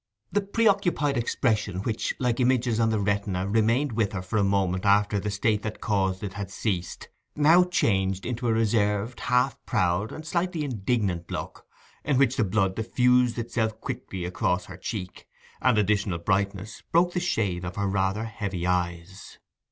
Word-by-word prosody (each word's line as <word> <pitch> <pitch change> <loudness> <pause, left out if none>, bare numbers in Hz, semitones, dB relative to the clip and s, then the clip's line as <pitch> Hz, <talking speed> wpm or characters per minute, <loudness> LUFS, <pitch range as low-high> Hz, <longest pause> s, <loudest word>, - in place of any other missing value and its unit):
The 205 - +2
preoccupied 195 -8 +1
expression 110 -5 0
which, 110 -1 -2
like 125 -2 0
images 125 -2 +2
on 115 -1 +3
the 110 -1 +1
retina, 100 -2 -1
remained 115 +7 +2
with 110 -2 0
her 95 -2 -3
for 95 +4 -2
a 100 - +3
moment 95 -2 +1
after 100 0 +3
the 105 - -3
state 105 +1 0
that 105 0 -5
caused 95 -3 0
it 100 -2 -4
had 100 -1 -5
ceased, 95 -3 -3 0.3
now 160 +5 +6
changed 95 - 0
into 120 0 -2
a - - +3
reserved, 110 0 +1
half 125 +2 +1
proud, 90 +4 +1
and 155 - -8
slightly 170 0 -1
indignant 105 -8 -1
look, - - -6 0.4
in 140 -3 +1
which 135 -1 +3
the 120 - +2
blood 95 -1 +1
diffused 125 +2 +2
itself 115 -1 -2
quickly 95 -9 -5
across 90 0 -1
her 95 - -10
cheek, 95 -1 -6 0.3
and 125 -4 +3
additional 100 -3 +1
brightness 100 +3 -2
broke 175 +1 +3
the - - 0
shade 100 - -1
of 90 0 -5
her 100 - -1
rather 95 +2 0
heavy 100 -5 -4
eyes. 90 +1 -3
105 Hz, 165 wpm, -26 LUFS, 95-125 Hz, 0.4 s, now